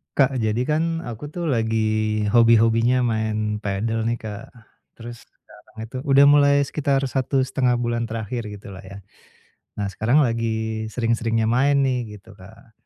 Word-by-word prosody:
Kak, 135 -2 +2
jadi 110 +1 0
kan 165 +3 -1
aku 120 +4 -7
tuh 170 +2 -4
lagi 110 -2 0
hobi-hobinya 115 +1 +4
main 110 -2 -1
padel 110 +2 -2
nih 120 0 -1
Kak. 105 -2 -7 0.5
Terus 120 0 -11
sekarang - - -22
itu 115 +3 -8
udah 140 0 +5
mulai 145 -1 +5
sekitar 140 -1 -1
1,5 130 -1 0
bulan 120 -1 -2
terakhir 115 +1 -5
gitu 105 -1 -10
lah 95 0 -10
ya. 100 +1 -10 0.8
Nah, 100 - -1
sekarang 120 +10 +2
lagi 110 -2 -2
sering-seringnya 115 -1 -1
main 140 +4 +2
nih, 125 -5 -2
gitu 105 +2 -16
Kak. 110 +6 -16
115 Hz, 145 wpm, -22 LUFS, 110-130 Hz, 0.8 s, udah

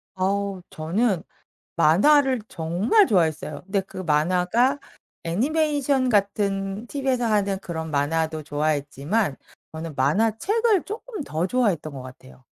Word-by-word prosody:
어우 195 0 -1
저는 180 +4 0 0.5
만화를 255 - +4
정말 180 - +2
좋아했어요. 160 -6 0
근데 195 0 0
그 190 - -11
만화가 180 - +2 0.5
애니메이션 280 - +1
같은 200 -1 0
TV에서 265 -2 -1
하는 200 -3 +1
그런 160 -3 -5
만화도 155 +2 0
좋아했지만 145 +4 -1 0.4
저는 160 -1 -6
만화책을 225 - +2
쪼끔 430 -2 -6
더 160 -3 -2
좋아했던 190 - 0
것 135 - -7
같아요. 65 - -14
195 Hz, 285 characters per minute, -24 LUFS, 160-245 Hz, 0.5 s, 만화를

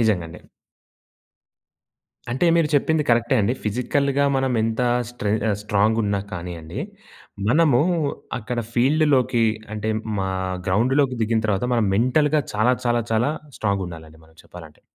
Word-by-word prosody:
నిజంగా 105 -7 +1
అండి. 85 - -12 1.9
అంటే, 130 +8 0
మీరు 160 -3 +2
చెప్పింది 155 +2 +2
కరెక్టే 120 +2 +2
అండి. 105 +4 +1
ఫిజికల్‌గా 140 +5 0
మనం 130 -1 0
ఎంత 115 +2 -1 0.3
స్ట్రె 105 -4 -2 0.2
ఆహ్, 100 - +1
స్ట్రాంగున్నా 105 -1 +1
కానియండి. 85 0 -6 0.7
మనము 140 -2 +4 0.6
అక్కడ 120 +1 -5 0.2
ఫీల్డ్‌లోకి 130 -3 +3 0.3
అంటే 105 +1 -3 0.3
మా 95 - -1 0.4
గ్రౌండ్‌లోకి 130 +7 +2
దిగిన 110 0 0
తర్వాత, 100 +1 0
మనం 115 -3 +2
మెంటల్‌గా 145 +6 +2
చాలా, 115 +4 +3
చాలా, 120 0 +2
చాలా 120 +6 +2 0.3
స్ట్రాంగుండాలండి 85 -6 -4
మనం 80 0 -24
చెప్పాలంటే. 80 -4 -13
115 Hz, 120 wpm, -22 LUFS, 100-130 Hz, 1.9 s, మనము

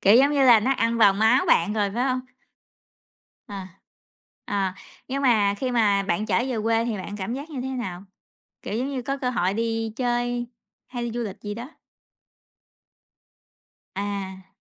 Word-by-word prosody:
kiểu 200 +3 +6
giống 275 +3 +5
như 280 -2 +3
là, 235 -3 +8
nó 260 +6 +2
ăn 230 -3 +1
vào 205 -3 +7
máu 220 +6 +3
bạn 170 +5 +3
rồi, 205 -2 0
phải 245 +2 +1
hông? 255 -1 0 1.3
À, 195 -2 -7 0.8
à, 195 -2 -1 0.3
nhưng 275 +2 -2
mà 215 -6 +4
khi 255 +2 -1
mà 210 -5 +3
bạn 195 +2 -1
trở 195 -5 +2
về 250 - -2
quê 225 0 +2
thì 230 -2 -2
bạn 200 +2 -6
cảm 205 +4 -3
giác 285 +5 -7
như 275 -4 -4
thế 260 - -3
nào? 195 -9 -5 0.6
Kiểu - - -5
giống 260 +3 -1
như, 270 -2 -3
có 275 +3 -2
cơ 255 -2 -1
hội 195 -6 0
đi 225 0 -1
chơi 245 -1 -1 0.4
hay 245 -1 -5
đi 235 - -3
du 240 - -4
lịch 200 -4 -7
gì 205 0 -4
đó? 235 +5 -7 2.3
À. 195 -1 -4
230 Hz, 180 wpm, -24 LUFS, 200-250 Hz, 2.3 s, là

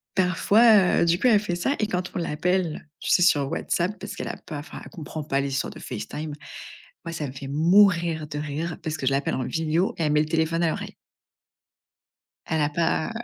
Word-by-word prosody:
parfois, 195 +2 +4
heu, - - +4
du 170 +1 +2
coup - - +3
elle 220 -4 +6
fait 200 -4 -3
ça 270 +11 0
et 215 - +1
quand 180 -3 -3
on - - -1
l'appelle, 170 0 -1
tu - - -5
sais - - +5
sur 145 -6 +3
WhatsApp 185 +5 -1
parce - - -7
qu'elle - - -5
a - - -4
pas 150 -3 -7
enfin, 150 - -9
elle - - -11
comprend 155 -2 -7
pas 140 -2 0
les 140 - -2
histoires 135 -1 -2
de - - -11
FaceTime. 150 +6 -6 0.7
Moi, 170 - -5
ça 155 -2 -3
me 130 - -7
fait 135 0 -8
mourir 170 +1 +3
de 150 - -5
rire 155 +3 -4
parce 155 -1 -3
que 135 - -4
je 135 - +3
l'appelle 140 +1 0
en 130 - -2
vidéo 160 +6 0
et 165 - 0
elle 150 - +1
met 150 - +4
le 155 - +1
téléphone 165 +1 0
à 170 - +3
l'oreille. - - -5 1.5
Elle 160 -1 0
a 145 - +2
pas, 160 +1 0
heu, - - -5
160 Hz, 230 wpm, -25 LUFS, 150-180 Hz, 1.5 s, elle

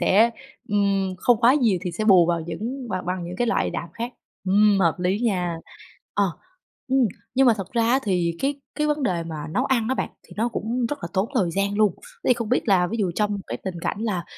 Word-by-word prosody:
sẽ, 210 +6 +5 0.4
ừm, 200 -2 +1
không 240 +2 +3
quá 245 +3 +6
nhiều 230 -10 +3
thì 180 - -2
sẽ 215 - -2
bù 185 -5 +6
vào 170 -1 +1
những 225 +11 -5
bằng 185 -4 -3
bằng 180 -1 -2
những 175 +1 -6
cái 240 - +1
loại 235 - +1
đạm - - -4
khác. 235 +2 -5 0.3
Ừm, 200 +1 +4
hợp 170 -3 +3
lý 180 +3 +1
nha. 180 -8 0 0.6
Ờ, 205 - +3 0.6
ừm, 265 +1 +3 0.4
nhưng 265 +1 +4
mà 235 - +6
thật 195 -2 -7
ra 235 - +2
á 260 - +4
thì 175 -5 0
cái 280 +1 -1
cái 300 - 0
vấn 300 -1 0
đề 180 -9 0
mà 165 -1 -6
nấu 250 +11 0
ăn 235 -5 +1
á 260 - +1
bạn, - - -2
thì - - -16
nó 225 +3 +1
cũng 235 +1 -2
rất 290 +5 -4
là - - -4
tốn 195 +3 0
thời 190 -9 +2
gian 200 +3 0
luôn. 210 -4 +4 0.3
Thế - - 0
thì 250 - +6
không 230 -2 -4
biết 250 0 +1
là 185 -3 +4
ví 220 - -3
dụ 195 -5 +1
trong 210 0 0
cái - - -4
tình 180 -3 -4
cảnh 200 - -3
là 200 -6 -1
205 Hz, 245 wpm, -24 LUFS, 180-235 Hz, 0.6 s, quá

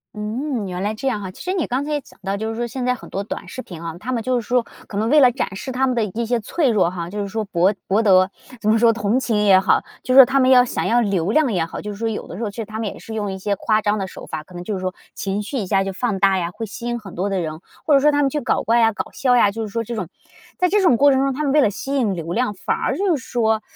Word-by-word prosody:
嗯， 220 +1 -3
原 180 0 -4
来 210 +2 -1
这 270 - -4
样 215 -6 -1
哈。 190 -2 -6
其 - - -14
实 370 +1 -2
你 360 - -1
刚 255 +3 -1
才 300 - -4
也 295 - 0
讲 - - -20
到 195 +1 -2
就 220 +1 -3
是 225 - -4
说 240 - -2
现 250 +1 -4
在 250 - +2
很 - - -12
多 195 - -3
短 215 - -6
视 255 - -6
频 170 -7 -10
啊， 165 -1 -5
它 250 +6 -4
们 230 -3 -1
就 255 -1 +1
是 225 - -9
说 245 -1 +2 0.2
可 200 - -6
能 220 +2 0
为 300 +3 +6
了 255 -3 +6
展 230 -6 -3
示 260 - -5
它 260 +1 +1
们 255 - 0
的 230 - +1
一 225 +4 -3
些 240 +1 0
脆 275 +6 0
弱 195 -7 +3
哈， 175 -1 -5
就 205 +3 -5
是 200 - -3
说 220 +2 -3
博 190 +1 +2
博 200 +4 +2
得 190 -3 +4 0.3
怎 215 - +1
么 220 - +3
说 230 -1 +5
同 220 +2 0
情 220 -5 0
也 190 -2 +7
好， 190 - +3 0.2
就 255 - 0
是 265 - +5
说 265 - +12
它 270 +2 +1
们 260 0 +4
要 250 -1 +7
想 - - -2
要 240 +1 +3
流 195 -3 0
量 295 -1 +3
也 170 -3 +1
好， 165 - -7
就 210 - -5
是 200 - -8
说 230 - -1
有 220 - -5
的 175 - -8
时 230 - -4
候 210 - -1
其 - - -13
实 225 - -4
它 215 +1 -7
们 220 - -2
也 - - -6
是 225 - -9
用 205 -3 -2
一 190 - -5
些 200 +1 -1
夸 215 0 +1
张 210 +1 +1
的 190 - -3
手 - - -10
法， 155 -1 -6
可 180 +2 -16
能 175 - -6
就 210 +3 -4
是 190 - -3
说 185 0 -3 0.2
情 200 +1 -3
绪 270 - -4
一 205 -6 -2
下 195 -1 +2
就 195 - -3
放 210 -2 -2
大 195 0 +4
呀， 170 -1 -2
会 225 +5 -5
吸 235 +3 -7
引 240 0 -2
很 195 -4 -11
多 195 +3 -2
的 195 - -1
人， 155 -1 -5 0.3
或 300 - +3
者 275 - +7
说 300 +2 +4
它 290 - +2
们 275 - +2
去 300 - -2
搞 - - 0
怪 235 +1 +3
呀， 225 -1 +4
搞 - - -5
笑 250 -2 +2
呀 205 -4 +4
就 225 +2 -5
是 220 - -3
说 230 +3 -3
这 235 +2 -6
种 185 -6 -3 0.5
在 360 - +2
这 415 +1 +3
种 295 -11 +4
过 285 0 +6
程 265 - +3
中 275 0 +1
它 300 +4 -3
们 280 - +1
为 295 +1 +5
了 215 - +4
吸 270 +7 -5
引 235 -8 +1
流 165 -1 -5
量， 235 -1 0
反 185 - -2
而 - - -1
就 370 -6 +1
是 260 - -11
说 220 -3 +1
220 Hz, 370 characters per minute, -21 LUFS, 195-255 Hz, 0.5 s, 说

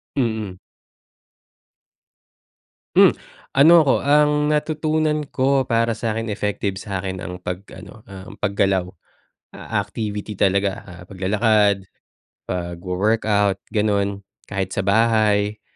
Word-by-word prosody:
Mhm. 110 -7 -2 2.4
Hmm, - - +7 0.4
ano 145 +5 +7
ko, 135 - +4
ang 150 +1 +3
natutunan 155 0 0
ko 135 +1 +2
para 115 0 +2
sakin, 115 0 -3
effective 100 -1 -2
sakin 95 -2 -4
ang 90 +1 -6
pag 90 +1 -5 0.2
ano, 110 - -13
um, 95 +3 -10
pag-galaw. 95 -2 +1 0.6
Ah, - - -3
activity 105 -2 -5
talaga, 100 0 +1
ah, 90 -2 -12
pag-lalakad, 100 0 +1 0.6
pagwo-workout, 95 +3 0
ganun, 100 -2 -1 0.2
kahit 95 -1 -3
sa 100 - -1
bahay, 105 0 +2
105 Hz, 100 wpm, -21 LUFS, 95-115 Hz, 2.4 s, Hmm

